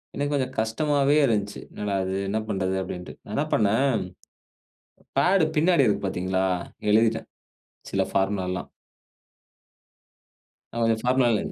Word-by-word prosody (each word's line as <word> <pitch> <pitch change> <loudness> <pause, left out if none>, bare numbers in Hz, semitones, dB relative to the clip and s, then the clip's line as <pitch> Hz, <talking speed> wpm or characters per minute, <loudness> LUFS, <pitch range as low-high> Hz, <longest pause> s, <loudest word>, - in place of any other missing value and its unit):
எனக்கு 145 +1 -1
கொஞ்சம் 130 -1 -2
கஷ்டமாவே 140 +5 +2
இருந்த்ச்சு. 105 -3 -1
"என்னடா 105 -1 -3
இது! 95 +1 -2
என்ன 110 +2 0
பண்றது!" 95 -2 -1
அப்டின்ட்டு. 90 -1 -7
நான் 105 - -7
என்ன 145 - +1
பண்ணேன். 115 +5 +3 1.2
பேடு 180 +4 +4
பின்னாடி 160 -4 +4
இருக்கு 100 -2 +1
பாத்தீங்களா? 95 +1 -1 0.5
எழுதிட்டேன். 110 +1 +2 0.6
சில - - +2
ஃபார்முலாலாம். 95 -2 -1 2.0
நான் 115 - -3
கொஞ்சம் 115 0 +1
பார்முலா. 125 -3 +3
110 Hz, 115 wpm, -25 LUFS, 100-135 Hz, 2.0 s, பேடு